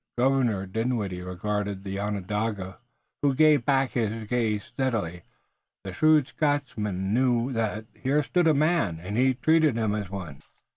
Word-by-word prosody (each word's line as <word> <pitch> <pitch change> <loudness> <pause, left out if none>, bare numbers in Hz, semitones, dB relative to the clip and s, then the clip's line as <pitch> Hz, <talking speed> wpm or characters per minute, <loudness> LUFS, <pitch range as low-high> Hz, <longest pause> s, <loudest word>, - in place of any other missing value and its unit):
Governor 120 -6 +2
Dinwiddie 105 -3 -2
regarded 100 +2 -3
the 100 0 -4
Onondaga, 105 0 -3 0.4
who 140 -2 +2
gave 150 -4 +4
back 135 -2 +2
his 110 -2 -2
gaze 110 -3 0
steadily. 105 -10 -2 0.6
The 95 -2 -6
shrewd 155 +5 +4
Scotchman 105 -11 -1
knew 125 +1 +2
that 110 -1 -2
here 140 +3 0
stood 165 +7 +1
a 155 - +4
man, 155 - +1
and 95 +5 -5
he 130 +2 +3
treated 155 -1 +3
him 110 -2 0
as 105 -3 -3
one. 90 -8 -7
110 Hz, 145 wpm, -26 LUFS, 100-135 Hz, 0.6 s, gave